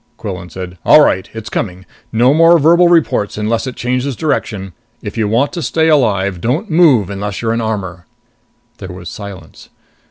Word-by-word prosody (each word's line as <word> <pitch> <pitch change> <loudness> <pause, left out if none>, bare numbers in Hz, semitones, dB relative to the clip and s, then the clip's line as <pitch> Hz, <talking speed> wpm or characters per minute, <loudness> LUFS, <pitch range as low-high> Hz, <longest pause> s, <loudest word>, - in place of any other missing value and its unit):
Quillan 95 -5 -7
said, 90 -1 -8
"All 155 - +7
right. 95 -8 0
It's 110 -1 -8
coming. 95 -3 -4 0.3
No 120 +4 +3
more 165 +2 +5
verbal 170 +3 +4
reports 160 -13 +1
unless 110 +4 -1
it 130 - -6
changes 125 +2 -2
direction. 105 - -3 0.3
If - - -6
you 110 -2 0
want 120 +7 0
to 175 - -4
stay 160 +1 +1
alive, 100 - +1
don't 155 - -2
move 140 - +4
unless 100 0 -4
you're 115 0 0
in 115 - -1
armor." 95 -6 -4 0.7
There 95 - -8
was 90 -2 -9
silence. 100 -2 -11
110 Hz, 170 wpm, -15 LUFS, 95-145 Hz, 0.7 s, All